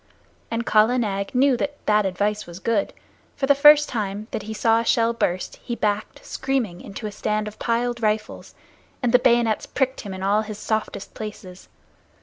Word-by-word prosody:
Kala 220 +4 +4
Nag 200 -2 -2
knew 265 +1 +4
that 290 +3 -3
that 210 -1 +3
advice 205 +2 -1
was 170 0 -9
good, 210 +1 0 0.4
for 275 - -1
the 285 - +5
first 295 +1 +7
time 210 -2 -4
that - - -3
he 215 +2 -7
saw 225 +1 +2
a - - -1
shell 230 0 +2
burst 185 -5 -2
he 240 - -5
backed, 210 -2 -2
screaming, 255 -10 -2
into 205 +3 -8
a 210 - -3
stand 210 +1 -2
of 210 0 -9
piled 240 +1 -1
rifles, 215 0 -2 0.5
and 240 - +2
the 250 - +6
bayonets 235 -3 +2
pricked 265 -1 -1
him 200 - -7
in 190 0 -6
all 205 +2 +2
his 215 -1 -7
softest 215 -2 -3
places. 200 -4 -9
215 Hz, 180 wpm, -23 LUFS, 205-240 Hz, 0.5 s, first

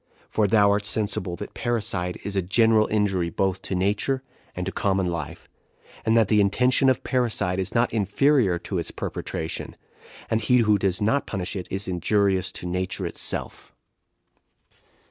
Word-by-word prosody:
for 105 -2 +1
thou 100 0 +4
art 105 0 +1
sensible 100 -3 -1
that - - -8
parricide 100 -6 -2
is 100 - -4
a 95 - +2
general 110 +3 +3
injury 95 -5 0
both 95 +2 -1
to 95 - -4
nature 105 +8 0 0.3
and 90 - -3
to 95 - -3
common 95 -1 0
life, 85 -4 -5 0.6
and 115 +1 +3
that 110 -3 +4
the 105 0 +4
intention 125 +6 +3
of 130 - 0
parricide 115 -8 0
is 95 0 -3
not 120 0 +2
inferior 110 -1 +2
to 90 +1 -4
its 85 - -4
perpetration; 80 0 -5 0.5
and 110 0 0
he 125 +4 +3
who 105 -1 +3
does 95 0 0
not 140 +7 +1
punish 95 +1 -4
it 95 - -5
is 95 +2 -2
injurious 95 0 +1
to 90 - -6
nature 90 +1 -2
itself." - - -2
100 Hz, 165 wpm, -24 LUFS, 90-110 Hz, 0.6 s, thou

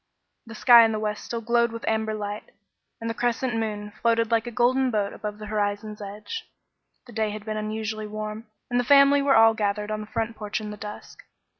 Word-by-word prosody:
The 225 - -9
sky 235 +1 +8
in 225 -1 +2
the 215 - -2
west 210 -1 -3
still 235 -1 -4
glowed 235 +1 +2
with 230 0 -7
amber 220 0 0
light, 205 0 -6 0.5
and 230 - -5
the 230 - -1
crescent 240 +1 -1
moon 210 -2 -3
floated 230 -1 +2
like 230 +1 +2
a - - -4
golden 255 +3 +2
boat 210 -4 -1
above 210 0 -6
the 215 - -8
horizon's 210 0 -2
edge. 210 - -7 0.6
The 240 - -13
day 220 0 0
had 210 0 -7
been 215 -1 -3
unusually 215 0 -3
warm, 215 +1 -6 0.2
and 245 - +2
the - - +2
family 280 +2 +6
were 280 -1 +3
all 225 0 +7
gathered 210 0 -2
on 215 0 -2
the 210 - -8
front 225 +1 -3
porch 210 +1 -4
in 210 -1 -6
the - - -6
dusk. 210 0 -9
220 Hz, 215 wpm, -25 LUFS, 210-230 Hz, 0.6 s, sky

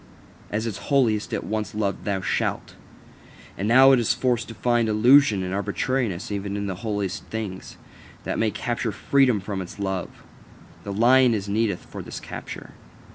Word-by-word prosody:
As 110 +2 -2
its 110 -4 -4
holiest, 120 -7 +2
it - - -2
once 110 0 -3
loved 100 -2 -2
"Thou 100 -2 -1
shalt": - - -2 0.8
now 120 +7 +6
is 120 -4 +3
it - - -1
forced 125 -2 +1
to 115 - -9
find 120 -2 +1
illusion 110 -1 +5
and 90 0 -3
arbitrariness 105 +1 -2
even 100 0 -3
in 100 - -3
the 95 -2 -4
holiest 105 -3 -3
things, 105 -4 -6 0.5
that - - -2
it - - -3
may 115 - +2
capture 120 +1 -2
freedom 130 -2 +2
from 100 0 -4
its 90 - -9
love: 95 -3 -2 0.7
the 100 - -5
lion 120 +3 +5
is 100 -1 -4
needed 105 -2 0
for - - -10
this - - -7
capture. - - -8
110 Hz, 170 wpm, -24 LUFS, 100-120 Hz, 0.8 s, now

